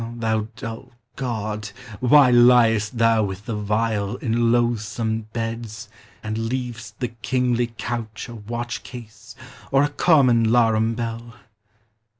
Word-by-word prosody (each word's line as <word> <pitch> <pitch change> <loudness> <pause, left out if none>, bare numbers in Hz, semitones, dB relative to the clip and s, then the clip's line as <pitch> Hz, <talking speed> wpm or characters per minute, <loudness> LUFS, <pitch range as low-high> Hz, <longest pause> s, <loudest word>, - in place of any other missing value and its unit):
O 115 +1 -6
thou 110 -2 -1
dull 115 +3 -8 0.2
god! 110 -4 -4 0.3
why 130 +1 +6
liest 120 -2 +4
thou 115 -1 +4
with 95 0 -5
the 115 - -4
vile, 105 0 -1
In 120 -4 0
loathsome 110 -2 -1
beds, 115 -1 -5 0.3
and 110 0 -3
leav'st 120 -2 -5
the 125 -2 -3
kingly 120 0 0
couch 115 -3 -5
A 120 - -9
watch 120 +3 -5
case, 115 -2 -12 0.4
or 135 +1 +4
a 145 - +1
common 130 -7 +3
'larum 115 -1 +3
bell? 115 0 -5
115 Hz, 130 wpm, -22 LUFS, 110-120 Hz, 0.4 s, why